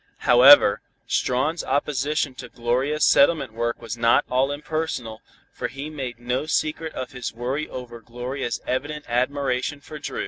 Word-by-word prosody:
However, 125 -3 +7 0.2
Strawn's 150 +7 0
opposition 145 +1 -1
to 125 -1 -10
Gloria's 130 +6 0
settlement 140 -5 +4
work 115 +1 -2
was 115 0 -5
not 115 0 +3
all 130 +2 +2
impersonal, 145 -7 -4 0.3
for - - -3
he 140 +5 -7
made 130 -5 -5
no 125 +5 -2
secret 155 +1 -1
of 130 - -5
his 125 -3 -5
worry 130 +6 -3
over 120 -2 -8
Gloria's 120 +1 -4
evident 145 +4 -3
admiration 130 +3 -1
for 150 +1 -10
Dru. 145 - -5
130 Hz, 145 wpm, -23 LUFS, 120-145 Hz, 0.3 s, However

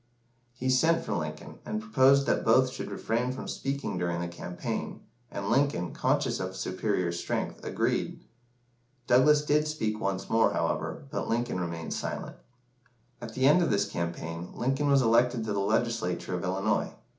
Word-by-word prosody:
He 130 +1 -3
sent 160 +6 +3
for - - -2
Lincoln, - - -5
and 215 - -3
proposed 140 -10 +4
that - - +1
both 130 +3 +4
should - - -6
refrain 120 +3 -1
from 130 - -6
speaking 135 -8 -3
during 85 -1 -1
the 85 - -2
campaign, 85 +1 -5 0.3
and 100 - -5
Lincoln, 120 -9 +1
conscious - - +1
of 95 0 -4
superior 95 -1 -1
strength, 85 - -3
agreed. - - -1 0.8
Douglas 145 +5 +5
did 150 +1 +2
speak 110 -8 -2
once 95 -1 -2
more, 115 0 +3
however, 80 - -2
but - - -3
Lincoln 120 -4 0
remained 85 -2 -4
silent. - - -4 0.9
At 110 -2 -8
the 130 - +2
end 150 +6 +6
of 170 - +2
this 100 0 +2
campaign, 85 0 -4
Lincoln 135 +4 0
was 140 -1 +5
elected 120 +1 +3
to 110 -2 -2
the 100 - 0
Legislature 100 -4 0
of 90 -1 -2
Illinois. 95 +4 0
115 Hz, 160 wpm, -29 LUFS, 90-135 Hz, 0.9 s, end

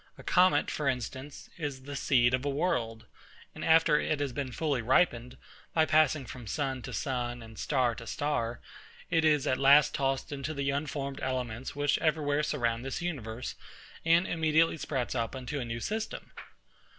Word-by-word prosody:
A - - -12
comet, 185 +1 +3
for 150 - -2
instance, 130 +3 -5
is 140 -4 -4
the 145 +1 -7
seed 125 -2 +3
of 125 +1 +1
a 145 - 0
world; 125 -7 -1 0.5
and - - -8
after 160 -2 +5
it 155 -1 -1
has 140 -3 -2
been 135 -1 -3
fully 145 -2 -1
ripened, 125 -1 +2 0.4
by 160 -1 +5
passing 155 -3 +3
from 120 0 -9
sun 135 0 -2
to - - -7
sun, 120 -3 -3
and 110 -1 -12
star 130 -4 +1
to 115 +1 -9
star, 120 -5 -2 0.5
it 165 -2 +3
is 150 -3 +3
at 130 - +1
last 140 +2 +6
tossed 135 0 -1
into 140 +2 -4
the 140 0 0
unformed 140 -1 -3
elements 130 -1 -3
which 145 0 +1
every 155 -1 +1
where 145 +1 +2
surround 120 -6 -1
this 135 +5 -4
universe, 125 -8 -4 0.5
and 165 +2 +4
immediately 160 -1 +2
sprouts 130 -5 -2
up 115 0 -2
into 130 +3 -4
a 125 - -3
new 115 0 -4
system. 220 - -4
140 Hz, 175 wpm, -30 LUFS, 125-150 Hz, 0.5 s, last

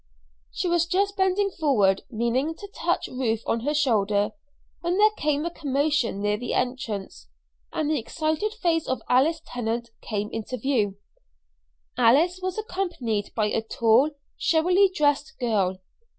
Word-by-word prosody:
She - - -2
was 345 -1 +2
just 395 +3 +1
bending 385 +1 +2
forward, 215 - +2
meaning 250 +7 0
to 405 - -9
touch - - -1
Ruth 230 -3 -1
on 230 - 0
her 290 +6 -1
shoulder, 210 -8 +2 0.5
when 350 +2 -1
there 425 +1 +6
came 300 -5 -1
a 340 - -2
commotion 280 -8 0
near 210 0 +1
the 245 +3 -3
entrance, 215 - -3 0.4
and 310 - -1
the 305 -2 +1
excited 315 - -1
face 340 -7 0
of 255 -4 -2
Alice 310 +6 +3
Tennant 235 -1 -3
came 210 -1 -3
into 225 +3 -4
view. 220 -6 0 1.0
Alice 335 +10 +4
was 370 +1 -3
accompanied 350 - -2
by 215 - +2
a - - +1
tall, 230 +5 +3 0.3
showily 360 +5 +3
dressed 300 -2 +1
girl. 200 -7 0
275 Hz, 145 wpm, -25 LUFS, 225-340 Hz, 1.0 s, there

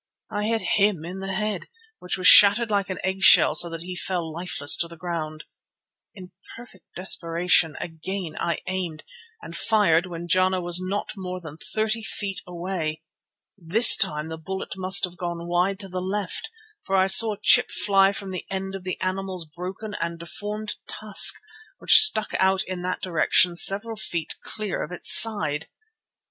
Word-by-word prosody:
I 210 -1 -3
hit 225 0 -2 0.2
him 200 -5 0
in 185 +3 -8
the 195 0 -6
head, 210 +1 -4 0.3
which 180 - -4
was 185 - -6
shattered 210 +4 +7
like 200 -1 -1
an 185 - -5
eggshell, 190 -4 +5
so 170 +3 +2
that 165 0 -8
he 180 +1 -8
fell 175 -2 -4
lifeless 160 -4 +1
to 170 - 0
the 170 0 -14
ground. 155 -3 -6 0.7
In 185 -2 -13 0.2
perfect 230 -6 -15
desperation 170 -3 0
again 170 0 -7
I 170 - -2
aimed, 180 -4 -5 0.4
and 165 - -10
fired 185 -4 +1
when 175 -1 -8
Jana 185 +1 +1
was 175 0 -1
not 195 +3 -4
more 185 -2 -7
than 160 -3 -12 0.2
thirty 220 +1 -1
feet 200 -2 -3
away. 170 -3 -5 0.5
This 200 +6 +7
time 150 0 0
the 160 0 -8
bullet 190 +4 -7
must 190 0 +2
have 180 -1 -3
gone 170 -1 -6
wide 180 +3 -1
to 195 - -7
the 185 -1 -6
left, 190 - -4 0.3
for 195 - -3
I 190 0 +3
saw 210 +3 +7
a - - -27
chip 245 +4 +5
fly 195 -1 +2
from 195 -1 -7
the 185 - -7
end 190 0 -5
of 195 -1 -8
the 185 -1 -6
animal's 185 -1 -4
broken 185 +7 -9
and 170 0 -4
deformed 210 +5 -6
tusk, 210 -2 +3 0.4
which - - +7
stuck 215 - +3
out 190 0 +1
in 185 -1 -7
that 180 0 -5
direction 175 0 +2
several 205 +5 +1
feet 175 -5 -4
clear 215 -3 -5
of 160 - -7
its 180 - +1
side. 205 -9 +3
185 Hz, 175 wpm, -23 LUFS, 170-195 Hz, 0.7 s, shattered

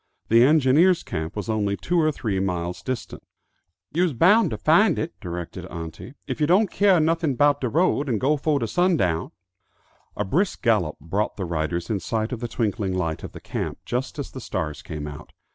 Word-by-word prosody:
The 115 +1 +6
engineers' 155 +5 +4
camp 80 +1 -4
was 105 -3 -4
only 105 -2 0
two 175 -1 +1
or 155 0 +3
three 105 -9 -2
miles 90 -2 -2
distant. 130 -3 -5 0.7
"You's 170 -1 +2
boun' 195 - +5
to 110 - -4
find 165 - +4
it," 165 - -3
directed 85 -2 -6
auntie, 80 - -8
"if 130 +3 -5
you 150 - +3
don't 190 +4 +3
keah 200 -3 +4
nuffin 160 -3 +1
'bout 145 +2 +3
de 125 - 0
road, 150 -1 +1
and 115 -4 0
go 145 +6 +2
fo' 150 0 0
de 120 - -1
sun 180 - +2
down." 85 - 0 0.9
A 105 - -1
brisk 180 - 0
gallop 105 -10 +2
brought 95 +8 -2
the 95 - -3
riders 85 +2 -2
in 105 - 0
sight 110 +5 -2
of 125 - -3
the 120 - -3
twinkling 105 -4 -1
light 80 -4 -2
of - - -7
the - - -9
camp, - - -4
just 125 +4 -3
as 145 - -5
the 130 - -8
stars 75 -8 -4
came 75 -1 -6
out. 75 0 -9
120 Hz, 200 wpm, -24 LUFS, -, 0.9 s, The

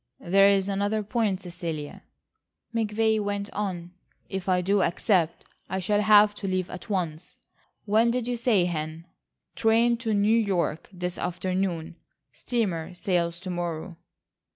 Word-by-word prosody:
"There 195 +3 +5
is 195 -1 +2
another 205 +2 0
point, 205 -3 -1
Cecilia," 170 -4 -6 0.7
McVay 220 0 +1
went 205 0 -3
on, 180 -4 -3 0.4
"if 190 -1 -4
I 180 -1 +3
do 195 +3 +2
accept, 175 -1 +1 0.2
I 190 - -2
shall 205 +3 +1
have 210 0 +6
to 200 - -4
leave 185 -1 -1
at 180 - -9
once. 175 -4 -3 0.5
When 220 +3 +3
did 245 0 -1
you 245 - 0
say, 230 -6 +2
Hen?" 160 -1 -4 0.5
"Train 230 +2 +3
to 225 -3 -1
New 205 +2 +3
York 190 -8 0
this 180 -1 -4
afternoon,—steamer 175 - -3
sails 175 -2 0
to 185 -1 -5
morrow." 175 0 -4
190 Hz, 135 wpm, -26 LUFS, 175-210 Hz, 0.7 s, have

